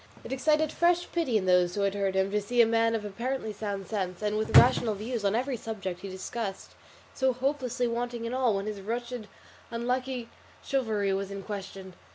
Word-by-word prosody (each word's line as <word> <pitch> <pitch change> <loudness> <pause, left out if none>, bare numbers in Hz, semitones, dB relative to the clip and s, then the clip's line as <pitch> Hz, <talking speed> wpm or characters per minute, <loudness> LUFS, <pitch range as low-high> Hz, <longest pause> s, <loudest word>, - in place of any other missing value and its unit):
It - - -5
excited 305 +3 +2
fresh 350 0 +2
pity 300 -10 +1
in 190 - -1
those 180 -1 +4
who 205 - 0
had 200 -1 +2
heard 195 -1 0
him 190 +1 +2
to 210 0 +1
see 240 +4 -2
a 235 - +9
man 230 0 +2
of 215 -2 -3
apparently 235 +2 -3
sound 200 -2 -4
sense, 190 -2 -3
and 210 0 0
with 215 +1 +4
rational 240 -3 +6
views 220 +2 -3
on 200 +1 +2
every 255 +3 0
subject 200 -6 -5
he 195 - -7
discussed, 195 +2 -5 0.4
so 265 -1 +2
hopelessly 255 -1 -1
wanting 235 0 -2
in 230 - -3
all, 255 -5 +2
when 195 0 -2
his 210 -2 -4
wretched 235 +1 -4 0.4
unlucky 250 +1 -2 0.4
chivalry 220 -8 0
was 195 0 -2
in 200 0 -6
question. 195 -2 -7
225 Hz, 200 wpm, -29 LUFS, 200-250 Hz, 0.4 s, a